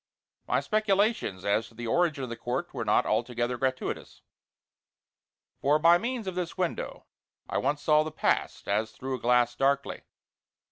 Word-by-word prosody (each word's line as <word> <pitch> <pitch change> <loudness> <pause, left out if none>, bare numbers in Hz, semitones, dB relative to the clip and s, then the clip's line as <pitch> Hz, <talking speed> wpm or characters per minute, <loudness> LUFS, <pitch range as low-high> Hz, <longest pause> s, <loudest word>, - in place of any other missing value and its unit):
My - - +2
speculations 210 - +1
as 105 +3 +1
to 115 - -20
the 120 +1 -6
origin 155 +2 +1
of 125 - -5
the - - -3
court 125 +8 -3
were 125 -4 -3
not 105 - +3
altogether 120 +2 0
gratuitous, 130 +1 -3 1.4
for 145 +2 +3
by 170 +3 +6
means 240 0 -3
of 190 - -3
this 175 -1 -4
window 180 -2 -3 0.4
I - - -1
once 145 0 -1
saw 155 -1 +5
the 155 - -2
Past, - - -1
as 110 +2 0
through 130 +3 -5
a 130 - -3
glass 120 0 +3
darkly. 140 +2 0
135 Hz, 160 wpm, -28 LUFS, 120-175 Hz, 1.4 s, by